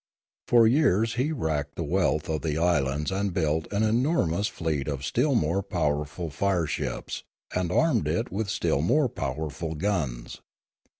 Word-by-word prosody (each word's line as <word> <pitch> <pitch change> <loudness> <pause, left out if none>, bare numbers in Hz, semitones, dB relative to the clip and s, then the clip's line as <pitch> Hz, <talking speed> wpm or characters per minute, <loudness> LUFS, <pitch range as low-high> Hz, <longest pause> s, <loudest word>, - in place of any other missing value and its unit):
For 120 -2 +6
years 115 - +3
he 130 +6 0
racked 75 - -2
the 85 - -3
wealth 80 -1 +1
of 80 -2 -1
the 75 -2 -1
islands 75 -3 +1
and 100 +1 -1
built 80 -2 0
an 105 +1 +1
enormous 110 - +1
fleet 80 -4 -2
of 70 -2 -3
still 135 - +1
more 90 -1 +1
powerful 80 -3 -2
fire 90 +2 +1
ships, - - -4 0.3
and 90 -1 -1
armed 155 - +2
it 80 +3 -1
with 100 +2 -2
still 70 - 0
more 140 - +3
powerful 75 - -4
guns. 75 -10 -2
85 Hz, 155 wpm, -27 LUFS, 75-105 Hz, 0.3 s, For